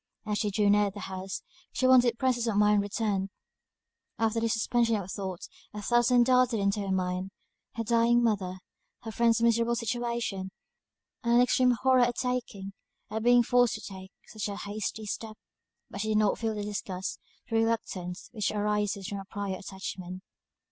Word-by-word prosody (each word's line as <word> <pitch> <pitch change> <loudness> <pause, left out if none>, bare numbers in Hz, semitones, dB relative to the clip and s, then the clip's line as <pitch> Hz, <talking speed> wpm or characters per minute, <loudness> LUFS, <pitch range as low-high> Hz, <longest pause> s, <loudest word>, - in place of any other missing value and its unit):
As 210 -1 -1
she 210 - 0
drew 205 +1 +1
near 205 0 +4
the 200 +1 -9
house, 190 0 -5 0.4
her 255 - +4
wonted 245 -2 +5
presence 245 -2 +1
of 215 -3 0
mind 210 0 +4
returned: 200 -1 -1 0.9
after 225 0 +1
this 225 -1 +1
suspension 230 +1 +1
of 195 -3 -4
thought, 190 -3 -5 0.3
a 210 - -5
thousand 240 +1 +4
darted 250 -2 +3
into 200 +1 +1
her 195 -1 -2
mind, 185 0 -1 0.5
her 230 - -2
dying 235 +1 +3
mother, 195 -5 0 0.5
her 225 - -5
friend's 230 +1 +2
miserable 235 0 +3
situation, 235 -4 -2 0.7
and 235 0 +3
an 240 - +7
extreme 250 0 +3
horror 260 -1 +5
at 245 0 +2
taking 235 -6 -3 0.4
at 220 +1 -2
being 245 +1 +5
forced 245 0 +3
to 215 - -7
take, 190 -1 -9
such 215 -1 -5
a 200 - -4
hasty 210 +1 -4
step; 215 +1 -5 0.5
but 200 - -5
she 220 - -2
did 215 -1 +2
not 210 -1 +2
feel 225 -1 -1
the 210 - -3
disgust, 200 -2 -4 0.3
the 225 - -3
reluctance, 205 -6 -1
which 215 -4 -1
arises 210 -2 -1
from 200 -2 -4
a 195 - -8
prior 200 -1 -4
attachment. 190 -2 -7
215 Hz, 175 wpm, -29 LUFS, 200-235 Hz, 0.9 s, an